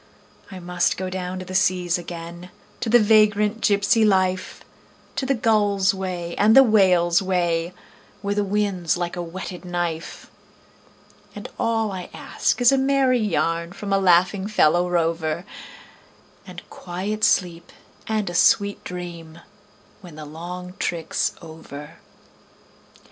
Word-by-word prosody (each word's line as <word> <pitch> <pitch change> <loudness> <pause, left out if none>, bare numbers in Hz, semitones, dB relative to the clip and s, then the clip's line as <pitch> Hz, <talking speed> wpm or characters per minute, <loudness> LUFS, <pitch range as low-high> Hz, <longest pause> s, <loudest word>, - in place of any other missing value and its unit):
I 190 - -9
must 180 0 -1
go 185 0 -4
down 185 0 -4
to 185 - -7
the 185 - -8
seas 180 -1 +1
again, 170 +1 -9 0.3
to 230 - -3
the 240 - +7
vagrant 210 0 +3
gypsy 205 +2 +3
life, 185 -3 0 0.5
To 265 - -1
the 275 - +2
gull's 205 -4 +2
way 180 -3 -5
and 215 +2 +5
the 270 - +10
whale's 185 -7 +3
way, 175 -3 0 0.5
where 200 0 -1
the 205 0 0
wind's 195 -4 -1
like 175 0 -3
a 175 - -4
whetted 180 +1 -7
knife; 175 -2 -4 1.0
And - - -7
all 225 -2 0
I 185 -2 -7
ask - - -1
is 245 - +6
a 270 - +2
merry 265 -2 +2
yarn 170 -4 -1
from 200 0 -4
a 195 - +3
laughing 185 +2 +3
fellow 175 -4 +2
rover, 165 0 -1 1.0
And - - -11
quiet 195 +5 -5
sleep 175 -4 +1 0.4
and 215 -2 -1
a 175 - -4
sweet 200 +3 +2
dream 170 -2 -8 0.6
when 175 -5 -12
the 155 -1 -9
long 180 +4 -8
trick's 170 -2 -2
over. 160 -1 -11
185 Hz, 140 wpm, -22 LUFS, 175-205 Hz, 1.0 s, the